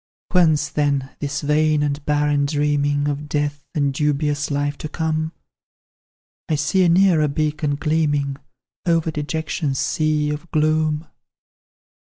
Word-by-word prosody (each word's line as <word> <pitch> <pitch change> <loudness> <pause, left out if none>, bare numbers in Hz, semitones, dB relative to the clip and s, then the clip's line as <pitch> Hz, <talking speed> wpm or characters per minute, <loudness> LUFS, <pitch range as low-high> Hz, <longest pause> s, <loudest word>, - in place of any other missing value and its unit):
"Whence, 155 -5 +3
then, 140 -2 0
this 145 0 -3
vain 150 0 +2
and 145 0 -2
barren 145 -1 +2
dreaming 145 -1 +1
Of 145 +1 -3
death, 145 -1 -1
and 140 -2 +1
dubious 145 0 0
life 145 0 -1
to 155 - -5
come? 160 0 -1 1.2
I 155 - +2
see 150 +6 +2
a 175 - +4
nearer 170 -3 +4
beacon 150 0 -1
gleaming 145 -2 0 0.5
Over 165 -1 +2
dejection's 150 -2 -2
sea 155 0 0
of 150 +3 -6
gloom. 155 0 +1
150 Hz, 125 wpm, -21 LUFS, 145-155 Hz, 1.2 s, a